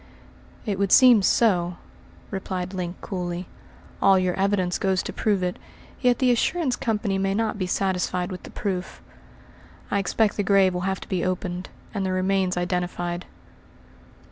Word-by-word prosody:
"It 200 -3 -2
would 200 -1 +1
seem 250 -5 +8
so," 180 -4 +2 0.6
replied 185 -1 -4
Link 180 -1 -4
coolly. 180 -2 -4 0.5
"All 195 -1 +6
your 185 -1 +1
evidence 190 -2 0
goes 190 -2 +1
to - - -5
prove 205 -4 0
it, 180 0 -2 0.4
yet 250 -2 +3
the 255 -2 +3
assurance 260 +3 +1
company 210 -4 -1
may 195 0 0
not 220 -1 -1
be 185 - -1
satisfied 180 -1 -1
with 185 - -6
the - - -11
proof. 190 -3 -4 0.9
I 200 - +2
expect 210 +2 +1
the 205 - +1
grave 195 -1 +4
will 180 - -2
have 190 - -3
to - - -9
be 185 -3 -1
opened, 185 0 -3 0.2
and 200 -3 -2
the 190 - -1
remains 185 0 +1
identified." 175 0 -2
190 Hz, 160 wpm, -24 LUFS, 180-200 Hz, 0.9 s, seem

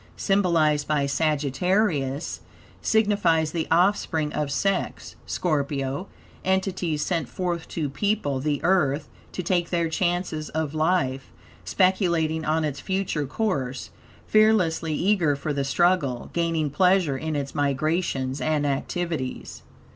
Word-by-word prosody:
symbolized 165 -7 +2
by 150 -2 +1
Sagittarius, 150 +1 0 0.4
signifies 200 -8 +2
the 165 -1 -2
offspring 165 -3 +2
of 150 -2 -1
sex 195 +7 -1
(Scorpio), 140 0 -1 0.4
entities 185 -5 0
sent 165 -8 -1
forth 175 -3 -3
to 155 -3 -2
people 145 -1 -1
the 145 +1 -1
Earth, 150 -6 +2 0.2
to 180 - -4
take 175 -1 0
their 170 -2 0
chances 175 -2 -1
of 155 -2 -2
life, 155 -5 0 0.3
speculating 170 -4 +1
on 155 +1 +1
its 145 -2 -3
future 185 -4 -2
course, 135 - -2 0.3
fearlessly 185 -8 +3
eager 175 -5 +2
for 145 +2 -3
the 140 -1 -1
struggle, 140 -4 +1
gaining 165 -3 0
pleasure 180 -2 +3
in 155 +3 -3
its 140 -2 -3
migrations 145 -1 -1
and 155 -2 +1
activities. 145 0 -3
160 Hz, 115 wpm, -25 LUFS, 145-180 Hz, 0.4 s, fearlessly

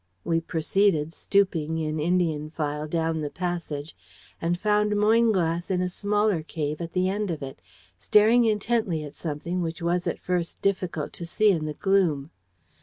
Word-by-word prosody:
"We 165 0 +1
proceeded 165 -1 +1
stooping, 165 -6 +1
in 155 -1 -2
Indian 160 -2 0
file, 150 -1 -3
down 160 0 -1
the 150 - -2
passage, 170 -4 -4 0.5
and 175 +1 0
found 210 +1 +2
Moynglass 205 -6 +2
in 185 -2 +1
a 180 0 0
smaller 205 -1 +1
cave 155 -1 -4
at 170 0 -5
the 185 0 +2
end 205 +1 -1
of 160 -4 -3
it, 135 0 -8 0.4
staring 225 +3 +5
intently 210 -6 0
at 145 - -8
something 170 +3 -3
which 165 -1 -3
was 175 +1 0
at - - -1
first 180 -2 -3
difficult 185 -6 -1
to 170 - -5
see 210 +4 +3
in 160 -5 -1
the 150 -1 -4
gloom. 170 -7 +1
170 Hz, 165 wpm, -26 LUFS, 155-200 Hz, 0.5 s, staring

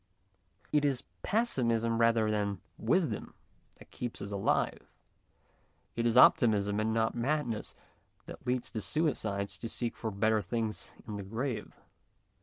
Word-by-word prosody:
It 150 -1 +3
is 135 -3 +1 0.2
pessimism 115 - +1
rather 115 -2 +4
than 105 -1 +1 0.3
94 - - -9
MONOLOGUES - - -3
wisdom - - +1 0.4
that - - -16
keeps 120 -1 -5
us 100 - -6
alive; 100 -1 0 1.1
it 115 0 +1
is 115 +1 +2
optimism 105 -5 +5
and 110 +1 +1
not 110 0 +1
madness 120 -3 -1 0.5
that - - -10
leads 125 0 -1
the 110 - -3
suicide 100 -4 -1
to 100 +4 -5
seek 120 0 -3
for 110 - -3
better 110 +1 +2
things 110 +2 -3
in 105 -2 -4
the 100 - -5
grave. 115 +3 -4
115 Hz, 145 wpm, -31 LUFS, 105-120 Hz, 1.1 s, optimism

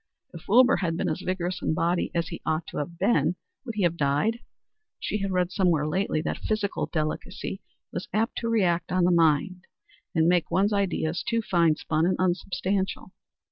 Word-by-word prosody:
If 170 - -11
Wilbur 250 +5 +6
had 170 -2 -1
been - - 0
as - - -3
vigorous 185 -1 -2
in 155 - 0
body 175 +2 +1
as 170 -1 0
he 170 - -7
ought 155 +1 -1
to - - -7
have 170 +3 -4
been, 180 -4 +2 0.3
would 230 -4 -6
he 205 - 0
have 170 -1 +1
died? 150 +11 +1 0.6
She 210 - -2
had 195 0 -2
read 180 -1 +1
somewhere 175 -6 +2
lately 155 -1 0
that - - -3
physical 215 -2 -1
delicacy 155 -2 -3 0.3
was - - -5
apt 225 +2 0
to 230 - -2
react 180 -6 +1
on 185 0 +2
the 180 - +4
mind 170 +2 +2 0.5
and 160 0 +4
make 175 -2 +2
one's 195 +5 +2
ideas 180 -4 0
too 230 -1 -1
fine 170 -5 +3
spun 155 +2 0
and 185 - +2
unsubstantial. 185 +1 -1
180 Hz, 185 wpm, -26 LUFS, 165-195 Hz, 0.6 s, Wilbur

